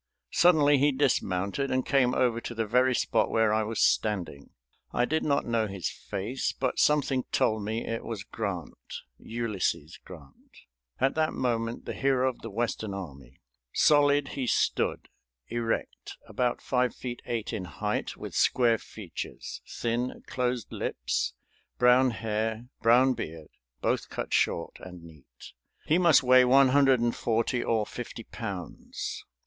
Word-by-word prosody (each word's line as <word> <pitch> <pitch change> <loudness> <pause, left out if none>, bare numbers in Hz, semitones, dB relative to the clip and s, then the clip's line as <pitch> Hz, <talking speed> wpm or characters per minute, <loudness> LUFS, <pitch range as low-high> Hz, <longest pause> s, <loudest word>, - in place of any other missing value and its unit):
Suddenly 150 -5 +5
he 145 +2 +4
dismounted 130 -3 0
and 130 0 0
came 130 -3 +2
over 120 -2 +1
to 120 - -6
the 115 0 -1
very 125 +4 +3
spot 110 -2 +1
where 110 -1 +2
I 110 - +2
was 110 +1 -3
standing. 90 -10 0 0.4
I 120 - +1
did 160 +4 0
not 140 -1 +1
know 115 -2 0
his 95 -3 -4
face, 115 +8 -3
but 130 -1 -2
something 140 -3 +2
told 110 -1 +1
me 110 +3 -3
it 115 0 -3
was 110 -4 -5
Grant, 90 - -6 0.2
Ulysses 105 -9 -3
Grant, 75 -7 -15 0.4
at 135 +1 +2
that 155 0 0
moment 115 -2 -2
the - - -4
hero 135 -1 +1
of 130 - -3
the 115 - -6
Western 110 -2 -2
army. 70 -9 -10 0.3
Solid 145 -1 +4
he 130 -3 -3
stood, - - 0 0.4
erect, 115 -1 -3
about 125 -1 -1
five 125 -2 0
feet 120 -1 -6
eight 115 -1 -3
in 100 -5 -3
height, - - -3
with - - -8
square 115 -3 +3
features, 100 -6 -8
thin, 120 +2 -3
closed 125 -2 -2
lips, - - -2 0.4
brown 125 +1 +5
hair, 110 0 -2 0.2
brown 125 +3 +5
beard, 80 -8 -7 0.3
both - - 0
cut - - -5
short, 85 - 0
and 90 -2 -11
neat. 75 -7 -15 0.3
"He 160 +4 +3
must 170 -6 +5
weigh 130 0 +7
one 135 +1 +5
hundred 135 -1 +4
and 120 0 +1
forty 115 +2 0
or 110 -2 +1
fifty 120 0 -7
pounds. 100 -6 -6
115 Hz, 150 wpm, -28 LUFS, 105-130 Hz, 0.4 s, weigh